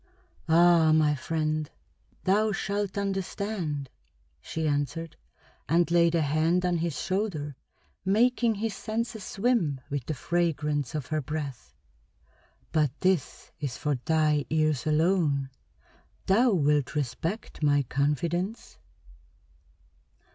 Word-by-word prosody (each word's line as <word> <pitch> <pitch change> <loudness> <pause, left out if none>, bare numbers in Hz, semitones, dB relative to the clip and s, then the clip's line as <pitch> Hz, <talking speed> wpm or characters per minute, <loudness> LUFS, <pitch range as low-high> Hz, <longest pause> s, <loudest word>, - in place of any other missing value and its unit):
"Ah, 165 -1 +6
my 155 -1 +4
friend, 155 +1 -2 0.5
thou 210 +3 +3
shalt 200 0 -2
understand," 195 -6 -2 0.5
she 160 - -3
answered, 150 +3 -2 0.5
and 170 +2 +3
laid 170 -1 +4
a 165 - +3
hand 160 +5 +2
on 175 -1 +1
his 165 -2 -2
shoulder, 185 -8 -2 0.5
making 230 +3 +3
his 220 +1 -2
senses 220 0 -3
swim 195 - 0
with 140 -2 -2
the 155 - -2
fragrance 150 -3 -1
of 150 -4 -2
her 155 0 -1
breath. 140 - -6 1.0
"But 155 -3 +2
this 185 -6 0
is 140 -5 -4
for 150 -1 0
thy 155 -3 +2
ears 155 -4 +1
alone. 155 -4 +2 0.7
Thou 230 +7 +4
wilt 150 - +1
respect 150 - -3
my 145 -1 +3
confidence?" 165 - -2
160 Hz, 110 wpm, -28 LUFS, 150-190 Hz, 1.0 s, Ah